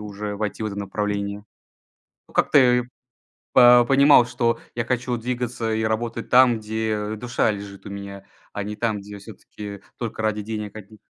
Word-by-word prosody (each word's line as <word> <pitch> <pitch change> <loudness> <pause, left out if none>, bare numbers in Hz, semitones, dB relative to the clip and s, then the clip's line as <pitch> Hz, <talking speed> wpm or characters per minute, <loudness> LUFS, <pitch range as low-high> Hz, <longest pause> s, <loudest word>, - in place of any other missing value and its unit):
уже 105 0 -5
войти 105 +1 -3
в - - 0
это 105 - -5
направление. 100 0 -3 0.8
Ну, - - -21
как-то, - - +4
э, 125 -2 +4 0.7
по 120 -1 +7
понимал, 135 -1 +6
что 120 -1 0 0.2
я 115 - -1
хочу 125 0 -1
двигаться 120 -1 -3
и 110 - -1
работать 115 +1 -2
там, 125 -2 +6
где 110 0 -2
душа 120 0 0
лежит 100 -1 -7
у 100 - -8
меня, 100 0 -8 0.3
а 105 - -4
не 105 +1 -5
там, 110 -2 -1
где 100 +1 -10
всё-таки 100 0 -10 0.2
только 115 -2 -4
ради 105 -1 -1
денег 105 -1 -6
одних. 110 +1 -12
110 Hz, 165 wpm, -23 LUFS, 105-120 Hz, 0.8 s, по